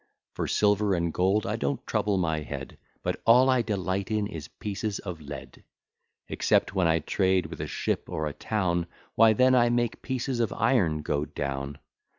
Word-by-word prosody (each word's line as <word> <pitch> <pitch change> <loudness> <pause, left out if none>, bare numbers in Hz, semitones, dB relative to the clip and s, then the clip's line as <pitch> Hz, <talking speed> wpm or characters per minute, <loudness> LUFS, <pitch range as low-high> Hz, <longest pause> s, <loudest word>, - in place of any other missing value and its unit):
For - - -3
silver 105 -1 +2
and 85 -2 -1
gold 95 +4 +2
I - - -1
don't - - -2
trouble 105 -2 0
my 80 -4 0
head, 75 - -7 0.2
But - - -2
all 125 +3 +6
I 130 -1 +3
delight 100 -3 -2
in 105 -1 0
is 80 -7 -7
pieces 105 +2 -4
of 90 -5 -7
lead; 70 -2 -9 0.6
Except - - +1
when 95 -4 +2
I 80 0 +3
trade 95 +3 +1
with - - -7
a - - -3
ship - - -2
or 80 - -2
a 75 - -3
town, 90 -5 -1 0.3
Why 115 0 +6
then 130 +3 +4
I 120 -2 +5
make 120 -1 0
pieces 130 -1 -2
of 115 -3 +1
iron 100 - +2
go 75 0 -1
down. 70 0 -4
95 Hz, 180 wpm, -27 LUFS, 80-115 Hz, 0.6 s, all